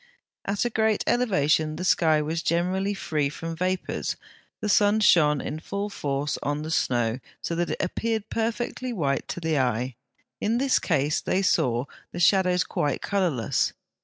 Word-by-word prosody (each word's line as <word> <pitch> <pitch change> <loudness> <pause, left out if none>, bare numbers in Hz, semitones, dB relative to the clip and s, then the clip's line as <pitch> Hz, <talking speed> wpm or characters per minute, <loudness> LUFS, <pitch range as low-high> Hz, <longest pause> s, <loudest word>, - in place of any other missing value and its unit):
At 200 +3 0
a 240 - 0
great 220 -1 +1
elevation 155 - +2
the 175 - -5
sky 160 -4 +3
was 160 +2 -2
generally 185 +5 0
free 150 -6 -1
from 165 +3 -6
vapours, 185 +2 -2 0.4
the - - -3
sun 205 +1 +4
shone 150 -8 +5
in 155 - -4
full 200 +5 -4
force 140 -3 -2
on 145 +1 -2
the 160 - -5
snow, 120 -5 +1 0.2
so - - -3
that 175 +1 -1
it - - -2
appeared 220 +3 -2
perfectly 235 +2 -2
white 145 -11 -1
to - - -4
the 160 -3 0
eye: 125 -1 -1 0.4
in 225 +3 +1
this 270 +1 +3
case 150 -3 +1
they 190 - 0
saw 125 -8 +2 0.3
the 175 - -5
shadows 180 0 +4
quite 145 -3 -2
colourless. 175 - 0
170 Hz, 165 wpm, -26 LUFS, 150-200 Hz, 0.4 s, shone